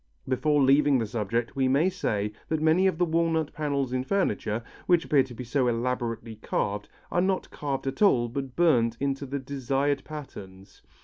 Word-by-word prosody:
Before 140 +3 +2
leaving 140 +1 +5
the 115 - 0
subject, 115 +1 -2
we 135 -1 +2
may 140 +7 +3
say 105 - -1 0.2
that 160 - 0
many 160 +5 +4
of 185 - 0
the 175 - +2
walnut 165 -2 0
panels 140 -4 -1
in 130 0 0
furniture, 120 - -1 0.2
which 175 -2 +4
appear 145 -3 +4
to 130 -2 -6
be 125 - -6
so 125 +1 0
elaborately 115 -2 -2
carved, 105 -1 -2 0.2
are 175 - +2
not 190 0 -1
carved 140 -2 -3
at 135 - -4
all 125 - +4
but 130 +1 -5
burnt 120 -10 +3
into 140 0 -2
the 140 +2 -3
desired 140 +1 -1
patterns. 100 -11 -10
135 Hz, 180 wpm, -27 LUFS, 120-155 Hz, 0.2 s, leaving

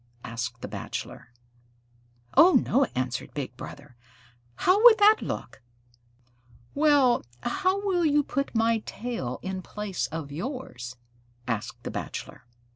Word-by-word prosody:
asked 120 +1 -5
the - - -3
Bachelor. - - -6 1.0
"Oh, 340 +6 +8
no," 270 +3 +4
answered 125 -1 -3
Big 135 -4 -4
Brother. 140 +1 -10 0.6
"How 370 +3 +3 0.2
that 425 +1 +6
would - - -6
look!" - - -5 1.1
"Well, 285 -4 +4 0.2
how 375 - 0
will 360 -3 +2
you 295 0 +3
put 275 -2 -3
my 225 0 +3
tail 225 - -4
in 190 0 -4
place 205 0 -4
of 160 -3 -6
yours?" 155 - -6 0.5
asked 115 -3 -3
the - - -4
Bachelor. - - -6
225 Hz, 120 wpm, -27 LUFS, -, 1.1 s, Oh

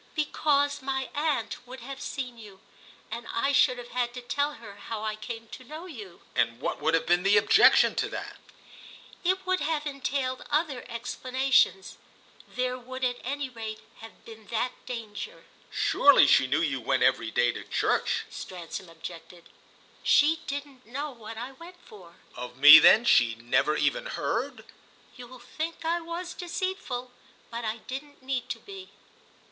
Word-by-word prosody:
"Because 290 -2 +1
my 265 0 -2
aunt 290 -8 -1
would 255 0 -9
have 270 +3 -8
seen 255 -3 -5
you, 205 -3 -13 0.5
and 230 +1 -6
I 275 +4 +1
should 255 -2 +4
have 245 0 -9
had 245 0 -2
to 250 - -6
tell 285 +4 -1
her 210 -6 -12
how 220 -2 -6
I 215 -1 -2
came 225 +1 -7
to 255 - -10
know 310 +7 -9
you." 215 - -10
"And 115 +1 +1
what - - -3
would 160 +2 +3
have 165 - 0
been 175 +1 +3
the 195 +2 +4
objection 205 +1 +6
to - - 0
that?" - - -7 0.9
"It 375 +1 +1
would 370 0 +1
have 300 0 -1
entailed 275 -2 -2
other 295 -4 0
explanations; 250 -4 +1 0.5
there 255 0 -2
would 255 +1 -8
at 245 -1 0
any 280 +2 -3
rate 220 -3 -7 0.2
have 225 0 -13
been 220 -2 -13
that 235 +3 -1 0.2
danger." 225 -4 -7 0.2
"Surely 285 - +5
she 135 -2 +5
knew 155 - +1
you 135 -5 -1
went - - +1
every 115 - +2
day 120 +1 +2
to - - -8
church," - - 0
Stransom 180 0 -8
objected. 170 +1 -11 0.5
"She 310 +3 +4
didn't 280 -2 -6
know 285 +5 -4
what 225 -2 -10
I 245 +3 -5
went 340 +6 -13
for." 180 -5 -15 0.2
"Of 125 0 -7
me 145 +3 +11
then 230 +2 +7
she 120 - +4
never 130 +6 +1
even - - 0
heard?" - - -3 0.5
"You'll 250 +1 -11
think 315 +7 -6
I 340 +1 +1
was 340 +2 -6
deceitful. 345 -9 -4 0.4
But 235 0 -4
I 220 +1 -2
didn't 280 +1 -8
need 260 -1 -3
to - - -3
be!" 390 -1 -11
250 Hz, 165 wpm, -28 LUFS, 210-285 Hz, 0.9 s, me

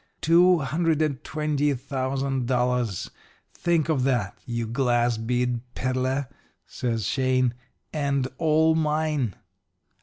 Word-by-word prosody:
Two 175 +3 +5
hundred 155 +2 0
and 140 -4 -2
twenty 150 -2 0
thousand 135 0 -2
dollars 125 -5 0 0.4
think 170 -3 +1
of 150 -6 +1
that, 120 -8 0
you 120 -1 -2
glass 120 -1 +1
bead 125 +1 0 0.2
peddler,' 130 +1 -1 0.4
says 115 -5 -3
Shane 130 0 +1 0.4
'and 140 -3 0
all 160 0 +4
mine.' 150 - 0
135 Hz, 110 wpm, -25 LUFS, 125-150 Hz, 0.4 s, Two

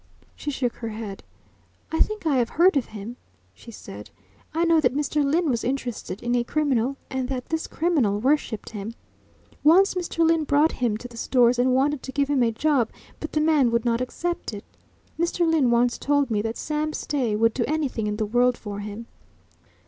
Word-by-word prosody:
She 295 - -5
shook 255 -4 -2
her 230 - -5
head. 215 -2 -6 0.7
"I 320 - -1
think 430 -4 0
I 290 -4 +2
have 240 -2 +1
heard 350 +2 +4
of 270 -5 +1
him," 220 +3 -8 0.4
she 235 - -14
said. 105 - -10 0.4
"I 330 +2 +1
know 330 -1 +4
that 290 - +1
Mr. 295 +1 0
Lyne 320 +5 +1
was 240 -5 0
interested 245 -5 -4
in 240 0 0
a 240 -1 +2
criminal, 275 -2 0
and 260 -1 -2
that 255 -2 -4
this 320 0 -2
criminal 285 - +1
worshipped 255 -4 0
him. 215 +1 -6 0.7
Once 360 +6 +6
Mr. 340 -2 0
Lyne 325 -1 +3
brought 295 +2 +3
him 235 -4 -1
to 245 - -8
the 235 -1 -13
Stores 245 0 +3
and 255 +1 +3
wanted 280 +1 +1
to 265 - -7
give 280 +1 0
him 275 -3 +2
a 230 -1 +3
job 260 -1 +1 0.3
but 310 - -6
the 305 - +2
man 305 -5 +4
would 235 0 0
not 235 0 +1
accept 335 -1 -3
it. 200 - -8 0.6
Mr. 340 0 +1
Lyne 315 -6 +3
once 240 +1 +2
told 285 -3 +1
me 210 -1 +1
that 225 +1 -3
Sam 305 0 -2
Stay 255 -10 -1
would 230 +1 +3
do 245 - 0
anything 280 -8 -1
in 210 0 -2
the 215 - 0
world 245 +3 +2
for 205 -1 -6
him." 210 +2 -7
255 Hz, 200 wpm, -24 LUFS, 230-305 Hz, 0.7 s, Once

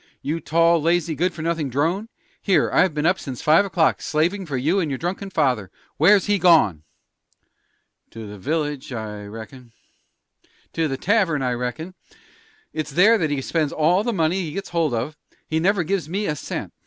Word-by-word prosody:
"You 155 +3 -2
tall, 165 +1 +3
lazy, 170 0 +1
good 175 +5 0
for 160 -2 -8
nothing 165 -4 -1
drone! 165 - -1 0.3
Here 195 - +2
I've 185 - +3
been 150 +1 -1
up 185 +2 +2
since 130 -4 -7
five 160 +6 +5
o'clock, 170 -4 +1
slavin' 175 +5 -1
for 140 -4 -2
you 160 +10 +1
and 165 -5 -1
your 135 - -2
drunken 190 +5 -4
father. 130 - 0 0.3
Where's 195 +5 +5
he 205 -1 +1
gone?" 155 - +4 1.3
"To 115 -1 -9
the 105 -1 -10
village, 150 - -3
I 105 -3 -6
reckon." 115 +3 -11 1.0
"To 165 -1 0
the 135 -2 -3
tavern, 175 -6 +1
I 125 - 0
reckon. 125 +9 -4 0.8
It's 155 -1 -3
there 200 +10 +4
that 160 -4 0
he 140 -2 -2
spends 155 -1 -1
all 175 +6 +2
the 240 - -1
money 175 -1 0
he 160 -4 -5
gets 195 - -5
hold 165 -7 0
of; 130 +7 -3 0.3
he 160 - 0
never 190 +2 +2
gives 170 -2 -2
me 200 +4 -2
a 150 - -1
cent. - - -6
160 Hz, 185 wpm, -22 LUFS, 135-180 Hz, 1.3 s, five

